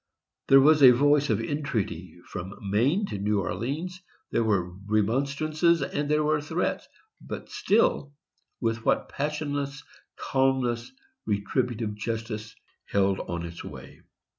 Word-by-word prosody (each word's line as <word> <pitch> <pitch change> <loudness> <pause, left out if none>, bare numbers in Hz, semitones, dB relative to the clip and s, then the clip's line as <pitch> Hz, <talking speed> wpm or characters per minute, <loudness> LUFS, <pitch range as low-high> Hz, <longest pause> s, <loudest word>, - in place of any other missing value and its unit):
There 135 - +8
was 150 +2 +5
a 130 - +11
voice 145 +2 +3
of 110 -2 +2
entreaty, 110 - -3
from 95 +3 -7
Maine 120 - +1
to 105 - -5
New 105 +1 +1
Orleans. 155 - -3 0.3
There 115 - +2
were 95 -5 +1 0.2
remonstrances, 140 - +1
and 145 +1 -2
there 150 0 +3
were 150 0 +1
threats; 160 +4 -2 0.3
but - - -7
still, 230 - +2 0.5
with 115 -1 -1
what - - +1
passionless 145 0 -3 0.3
calmness 130 -3 0 0.4
retributive 110 +1 -1
justice 110 0 -5 0.3
held 95 -1 +1
on 85 -1 -4
its 85 0 -8
way! - - -10
130 Hz, 125 wpm, -27 LUFS, 105-150 Hz, 0.5 s, a